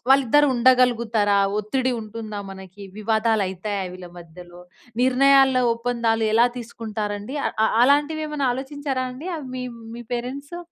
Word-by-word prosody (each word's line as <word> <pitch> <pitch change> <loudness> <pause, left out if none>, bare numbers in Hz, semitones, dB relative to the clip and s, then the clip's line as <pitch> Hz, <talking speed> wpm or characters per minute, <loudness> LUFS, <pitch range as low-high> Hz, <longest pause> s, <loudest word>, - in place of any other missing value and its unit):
వాళ్ళిద్దరూ 275 +2 +5
ఉండగలుగుతారా, 235 -5 +3 0.2
ఒత్తిడి 255 +5 -1
ఉంటుందా? 215 -1 -7
మనకి 190 +1 -11 0.2
వివాదాలు 220 0 +1
అయితాయ 195 +2 -4 0.2
వీళ్ళ 180 0 -10
మధ్యలో, 175 +1 -13 0.4
నిర్ణయాల 270 +1 +4 0.2
ఒప్పందాలు 230 -1 -1
ఎలా 235 +2 +5
తీసుకుంటారండి? 215 0 -5
అ - - +2 0.3
అలాంటివి 290 +4 +2
ఏమైనా 290 -3 -2
ఆలోచించారా 270 0 -4
అండి. 275 +8 -9 0.3
మీ 255 - -4 0.3
మీ 240 - -8
పరెంట్సు? 280 +7 -6
235 Hz, 120 wpm, -23 LUFS, 210-265 Hz, 0.4 s, వాళ్ళిద్దరూ